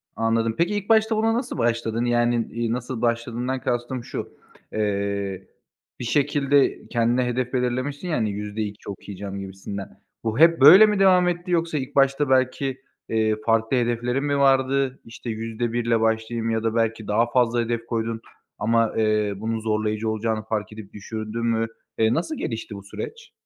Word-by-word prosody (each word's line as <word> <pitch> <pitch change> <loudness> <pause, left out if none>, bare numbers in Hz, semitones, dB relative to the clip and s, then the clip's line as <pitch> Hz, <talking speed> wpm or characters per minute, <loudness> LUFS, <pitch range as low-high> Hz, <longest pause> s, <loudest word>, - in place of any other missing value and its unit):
Anladım. 115 0 +1
Peki, 175 +5 +1
ilk 205 +1 -4
başta 220 0 +4
buna 225 +1 +2
nasıl 240 - -3
başladın? 115 0 0
Yani, 120 -1 +1
eee, 115 -1 -2
nasıl 125 -1 -4
başladığından 120 +2 -1
kastım 120 +1 -2
şu: - - -6 0.4
Eee, 100 -2 -2 0.5
bir 125 - -4
şekilde 140 +1 +2
kendine 120 +1 +1
hedef 125 +1 -2
belirlemişsin 130 +6 -1
ya, 160 - 0
hani, 110 -3 0
%2 105 0 -5
okuyacağım 100 0 -7
gibisinden. 95 +1 -7 0.3
Bu 110 +4 -2
hep 165 -3 +6
böyle 185 +10 +10
mi 210 -2 +1
devam 185 -2 +5
etti 175 +1 -2
yoksa 165 -2 +1
ilk 135 +1 -5
başta 135 +1 +3
belki, 130 +1 +1 0.3
eee, 110 -1 +2
farklı 115 +2 +2
hedeflerin 120 +3 0
mi 145 -1 0
vardı? 135 -1 +2
İşte 115 +1 -8
%1 115 +1 -2
ile 115 -1 +2
başlayayım 115 +1 0
ya 115 0 0
da 115 0 0
belki 115 -1 0
daha 115 +3 +1
fazla 120 -1 +2
hedef 115 0 -2
koydun 115 -1 -2 0.4
ama, 115 0 +2
eee, 105 -2 +1
bunun 110 +1 -2
zorlayıcı 110 0 -1
olacağını 110 0 -1
fark 110 -2 -3
edip 110 -2 -11
düşürdün 110 +2 -5
mü? 115 -1 +1 0.3
Eee, 110 +1 +3
nasıl 230 - -2
gelişti 110 -2 -4
bu 100 - -9
süreç? 460 - -8
115 Hz, 165 wpm, -24 LUFS, 110-135 Hz, 0.5 s, böyle